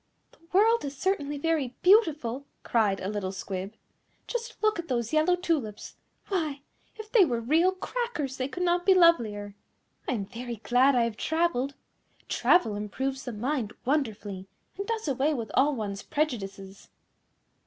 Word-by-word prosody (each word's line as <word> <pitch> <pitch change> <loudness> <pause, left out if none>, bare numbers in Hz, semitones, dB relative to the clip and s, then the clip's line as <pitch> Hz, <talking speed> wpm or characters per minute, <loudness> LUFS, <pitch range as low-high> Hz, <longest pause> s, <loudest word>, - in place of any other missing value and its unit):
"The - - -25
world 445 +5 +4
is 280 -1 -5
certainly 295 -5 -1
very 290 -4 -1
beautiful," 300 - +3 0.2
cried 210 -4 +2
a 185 - -4
little 200 -2 -2
Squib. 190 +2 -5 0.5
"Just 470 -1 -4
look 430 -3 +2
at 340 - -5
those 235 0 -2
yellow 310 +4 +4
tulips. 310 - -3 0.3
Why! 310 -8 -1 0.3
if 435 -1 -10
they 445 -5 +7
were 245 -8 0
real 320 +10 +3
Crackers 375 - -3
they 255 - -1
could 360 +6 -4
not 350 0 +2
be 385 +1 +5
lovelier. 225 - +3 0.5
I - - 0
am 205 -5 -2
very 240 +2 -6
glad 245 +6 +3
I 240 - +4
have 230 -2 -2
travelled. 315 -5 0 0.5
Travel 225 - +3
improves 265 +6 -3
the 250 - -3
mind 235 0 -2
wonderfully, 215 -9 -2 0.3
and 400 +1 -5
does 450 -5 -2
away 280 +3 +1
with 225 -5 -5
all 280 +2 +3
one's 200 -4 -4
prejudices." 200 -10 -4
275 Hz, 155 wpm, -28 LUFS, 220-340 Hz, 0.5 s, they